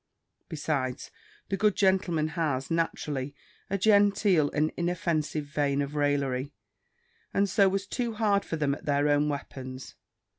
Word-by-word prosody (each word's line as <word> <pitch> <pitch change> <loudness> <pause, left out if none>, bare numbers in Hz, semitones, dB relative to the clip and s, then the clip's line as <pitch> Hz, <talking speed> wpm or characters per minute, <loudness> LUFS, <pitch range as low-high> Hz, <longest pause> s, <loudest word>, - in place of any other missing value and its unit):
Besides, 140 -4 -3 0.4
the 195 - -1
good 210 0 +2
gentleman 185 -5 +2
has, 150 -3 -2
naturally, 145 -4 -2 0.3
a 195 - 0
genteel 200 -5 +4
and 155 +1 0
inoffensive 165 -4 -1
vein 145 -1 0
of 140 0 -2
raillery, 145 -2 0 0.8
and 200 0 +3
so 195 0 +4
was 195 +1 -2
too 235 +3 -3
hard 210 -2 +2
for - - -4
them 145 -3 0
at - - -8
their 145 0 +2
own 145 0 +3
weapons. 130 -2 -6
155 Hz, 140 wpm, -28 LUFS, 145-190 Hz, 0.8 s, genteel